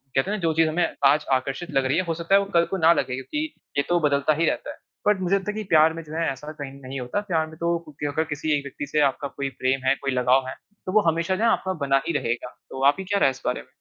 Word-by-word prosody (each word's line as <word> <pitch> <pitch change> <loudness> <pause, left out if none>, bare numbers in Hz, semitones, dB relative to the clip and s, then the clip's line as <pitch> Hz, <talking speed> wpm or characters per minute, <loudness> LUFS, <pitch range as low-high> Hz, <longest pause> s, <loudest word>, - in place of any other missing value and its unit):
कहते 135 +7 +2
हैं 215 - -1
ना - - -8
जो 165 -2 +1
चीज़ 160 0 +3
हमें 170 +2 +1 0.2
आज 150 +2 +4
आकर्षित 135 +6 -1
लग 135 -1 +1
रही 130 - +1
है - - +3
वो - - -13
हो 165 - 0
सकता 170 +4 +1
है - - +7
वो 200 - -3
कल 170 0 +5
को 195 - -3
ना 165 0 +6
लगे 130 -5 -1
क्योंकि 300 - -3 0.3
ये 140 - +3
तो 175 0 +3
बदलता 145 0 +2
ही 165 +3 +1
रहता - - -1
है। - - -12 0.3
बट 210 -2 +4
मुझे 185 +2 +2
लगता 200 +1 -1
है - - -10
कि 215 - -3
प्यार 160 -1 +5
में 165 - -6
जो 155 0 -11
है 165 +1 0
ऐसा 150 +3 -8
कहीं 145 -3 -7
नहीं 130 0 -6
होता। 125 +10 -2
प्यार 160 -3 +1
में 160 - -12
तो 170 +1 0
क्योंकि 150 0 -7
अगर 160 - +1
किसी 150 +1 -2
एक 140 - -5
व्यक्ति 140 +1 -6
से 150 +2 0
आपका 140 +2 -5
कोई 140 0 -4
प्रेम 130 +1 0
है, 130 - +5
कोई 135 0 -3
लगाव 130 +1 +2
है, 130 - -4 0.3
तो 185 - -3
वो 215 - +6
हमेशा 170 +3 0
जो 215 - -2
ना 230 - +5
आपका 190 -3 0
बना 135 0 +3
ही 170 - 0
रहेगा। 120 +1 -2 0.2
तो 130 0 -5
आपकी 145 +7 +3
क्या 200 +1 0
राय - - +5
है - - +3
इस 130 - -12
बारे - - -1
में? - - -20
155 Hz, 315 wpm, -24 LUFS, 135-170 Hz, 0.3 s, है